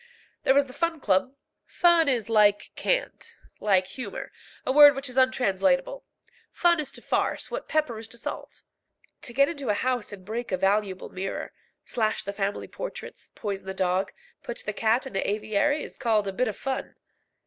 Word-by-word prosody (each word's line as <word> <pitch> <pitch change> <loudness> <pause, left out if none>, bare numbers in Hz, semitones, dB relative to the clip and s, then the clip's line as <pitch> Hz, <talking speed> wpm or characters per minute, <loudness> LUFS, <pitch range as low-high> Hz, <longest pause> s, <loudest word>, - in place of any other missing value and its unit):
There 265 - +3
was 280 0 +5
the 255 - -12
Fun 335 +2 -1
Club. 215 +4 +1 0.3
Fun 340 -3 +3
is 240 -5 0
like 210 -2 +3
cant, - - -2 0.2
like 190 -3 +3
humour, 205 +2 -7 0.3
a - - +1
word 290 +1 +9
which 275 +1 -3
is 250 - -6
untranslatable. 265 - +2 0.5
Fun 345 -2 +3
is 295 -3 -3
to - - -8
farce - - -1
what - - -4
pepper 295 -8 0
is 225 - -9
to 235 - -9
salt. - - -7 0.6
To - - -7
get 275 +3 +4
into 285 -6 -4
a 205 - +3
house 250 0 -1
and 190 -3 -10
break 230 +3 -4
a 185 - +1
valuable 195 0 0
mirror, 190 +1 -5 0.3
slash 220 -2 -1
the 200 - -4
family 200 0 -2
portraits, - - -8
poison 200 -3 -4
the 190 - -4
dog, 185 0 0 0.3
put 240 - -6
the 210 - -2
cat 225 +5 +1
in 265 - -8
the 195 - 0
aviary, 215 +8 +1
is - - -9
called 220 -4 +2
"cutting 195 - -3
a - - -17
bit 255 - +2
of 215 - -4
fun." 270 -1 -4
230 Hz, 190 wpm, -26 LUFS, 200-275 Hz, 0.6 s, word